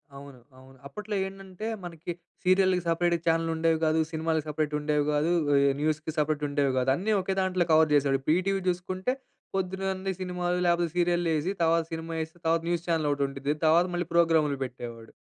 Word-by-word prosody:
అవును. 140 -2 -11 0.2
అవును. 130 0 -16
అప్పట్లో 210 +7 -6
ఏంటంటే 195 +1 -8 0.2
మనకి 170 0 -6 0.3
సీరియల్‌కి 185 0 +3
సపరేట్‌గా 170 0 +1
చానెల్ 165 0 +2
ఉండేవి 160 0 +1
గాదు. 155 +1 +2
సినిమాలకి 160 -1 -1
సపరేట్ 150 0 -1
ఉండేవి 150 -1 0
గాదు. 150 +3 +1 0.2
ఆహ్, 140 0 +4
న్యూస్‌కి 155 +1 -1
సపరేట్ 150 0 0
ఉండేవి 140 -2 +1
గాదు. 130 +1 +1
అన్ని 210 +6 0
ఒకే 190 +1 -2
దాంట్లో 185 -2 +1
కవర్ 155 -1 +5
జేసాడు. 140 -1 +3
ఇప్పుడు 155 +4 +2
ఈటీవి 195 +1 0
జుసుకుంటే 185 +6 -2 0.4
పొద్దునన్ని 190 0 -2
సినిమాలు 180 -1 -1
లేపోతే 170 0 +2
సీరియల్లేసి 175 -1 +1
తర్వాత 165 0 +3
సినిమా 165 0 -5
ఏసి 160 +2 -12
తర్వాత 165 0 +2
న్యూస్ 175 -1 -1
చానెల్ 160 -3 +1
ఒకటి 140 0 0
ఉండిద్ది. 140 +1 -2
తర్వాత 165 +3 +5
మళ్ళీ 175 -1 -1
ప్రోగ్రామ్‌లు 160 -4 +3
పెట్టేవాడు. 120 -2 -9
165 Hz, 170 wpm, -27 LUFS, 150-180 Hz, 0.4 s, కవర్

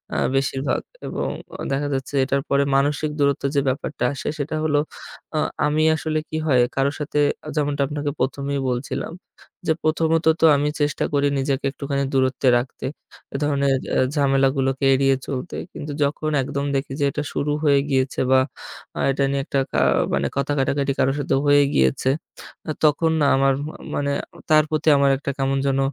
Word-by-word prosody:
আ - - 0 0.2
বেশিরভাগ 135 +1 0 0.3
এবং - - -3 0.3
অ - - -6
দেখা 140 +1 0
যাচ্ছে 135 +1 -4
এটার 140 +1 0
পরে 140 0 +3
মানসিক 145 +2 +1
দূরত্ব 140 -1 +1
যে 140 - +4
ব্যাপারটা 135 0 -3
আসে 135 - -4
সেটা 145 +2 -2
হলো, 150 -2 +2 0.6
আ - - +1 0.3
আমি 150 +1 +2
আসলে 155 0 -1
কি 155 - -3
হয়? 130 -4 +4
কারো 135 +1 +2
সাথে 150 0 -2 0.2
এ্যা 155 - -7
যেমনটা 145 -1 0
আপনাকে 145 0 -3
১ম 135 +2 -1
এই - - 0
বলছিলাম 125 +5 -3 0.5
যে, - - +4
প্রথমত 160 +1 +1 0.2
তো - - +6
আমি 145 +1 +1
চেষ্টা 145 0 0
করি, 145 0 +3
নিজেকে 135 +1 -1
একটুখানি 140 0 -2
দূরত্বে 130 0 +1
রাখতে, 125 +1 -5 0.5
এ - - +1
ধরনের 140 -2 +2 0.2
এ - - +2 0.2
ঝামেলাগুলোকে 135 -1 +2
এড়িয়ে 135 0 +3
চলতে। 135 +4 -4 0.2
কিন্তু 150 - -6
যখন 150 +2 -1
একদম 140 +2 -3
দেখি 135 0 -2
যে, 145 - +2
এটা 150 - -3
শুরু 145 +1 -1
হয়ে 140 -2 +4
গিয়েছে 130 -1 0
বা 130 - +6 0.6
আ - - -3
এটা 140 +1 0
নিয়ে 140 0 0
একটা 140 -3 0
কা - - +1 0.3
মানে 70 0 +1
কথা 140 +1 0
কাটাকাটি 140 +1 +1
কারো 135 - +3
সাথে 140 - 0
হয়ে 145 0 +6
গিয়েছে, 65 - +2 0.6
আ - - +1
তখন 155 +2 +3
না - - +4
আমার 135 0 +3
মা 155 - -7 0.2
মানে 140 0 0 0.4
তার 155 0 +6
প্রতি 155 0 -2
আমার 140 0 +4
একটা 140 +1 -3
কেমন 135 0 0
যেন 135 0 +1
140 Hz, 180 wpm, -22 LUFS, 135-150 Hz, 0.6 s, তো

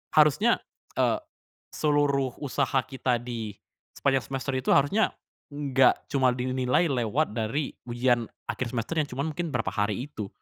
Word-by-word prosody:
harusnya, 155 - +5 0.4
eee, - - +3 0.6
seluruh 145 -4 +2
usaha 135 0 +1
kita 125 -2 -1
di 115 -4 -5 0.4
sepanjang 135 -2 +2
semester 135 0 -3
itu 130 - -1
harusnya 145 +11 +3 0.4
enggak 135 -3 +3
cuma 130 -2 +4
dinilai 130 +5 +1
lewat 125 +3 0
dari 120 +6 -1 0.2
ujian 120 -1 +2 0.2
akhir 130 - -3
semester 120 +6 -2
yang 145 - -1
cuma 130 +2 -2
mungkin 165 +2 -3
berapa - - 0
hari 105 +3 -1
itu. 105 -9 -6
130 Hz, 140 wpm, -27 LUFS, 120-145 Hz, 0.6 s, harusnya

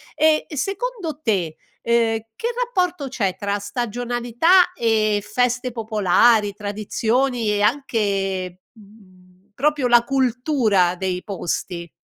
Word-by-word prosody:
e, 310 0 +3
secondo 390 - -3
te, 185 - -1 0.3
ehm, 230 -1 +1 0.2
che 460 - -3 0.2
rapporto 360 - -1
c'è 205 -8 -2
tra 200 +1 -2
stagionalità 240 - +1
e 215 - +1
feste 250 +3 0
popolari, 215 -1 +2
tradizioni 220 +4 -1
e 205 0 0
anche, 195 -7 -1
mhmm, 205 -4 -20 0.3
proprio 290 0 +1
la 240 -1 +5
cultura 245 - +1
dei 180 -1 -3
posti? 175 -2 -4
225 Hz, 105 wpm, -21 LUFS, 200-260 Hz, 0.3 s, la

